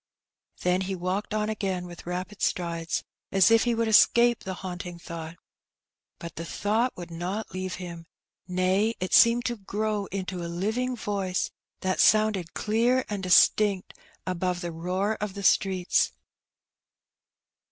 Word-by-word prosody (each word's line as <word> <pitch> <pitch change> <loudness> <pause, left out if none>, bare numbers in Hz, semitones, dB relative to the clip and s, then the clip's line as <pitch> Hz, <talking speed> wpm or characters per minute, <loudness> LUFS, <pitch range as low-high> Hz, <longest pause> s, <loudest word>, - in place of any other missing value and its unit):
Then 180 +1 +1
he 190 0 -2
walked 185 +3 -3
on 215 0 0
again 195 -4 -2
with 175 -1 -11
rapid 185 +3 -5
strides, 170 -1 -1 0.3
as 195 +1 +5
if 225 +1 +5
he 240 -1 +1
would 230 0 0
escape 235 +2 +5
the 190 -1 -4
haunting 180 -1 -6
thought. 165 0 -8 0.8
But 170 -1 -9
the 165 - -4
thought 215 +8 -1
would 175 -1 -8
not 180 +6 -4
leave 185 0 -3
him; 170 -2 -8 0.4
nay, 185 +5 +1
it 185 - -3
seemed 235 +1 +6
to 240 -1 -1
grow 210 0 -2
into 185 -2 -4
a 170 - -4
living 220 +9 -1
voice, 200 -4 -2 0.3
that 185 0 -1
sounded 215 -6 +3
clear 235 +4 +1
and 205 -2 -3
distinct 195 +1 +4 0.3
above 180 0 -2
the 175 -2 -4
roar 185 +6 -1
of 210 -2 -3
the 200 - -6
streets. 190 -2 +2
190 Hz, 145 wpm, -27 LUFS, 180-215 Hz, 0.8 s, seemed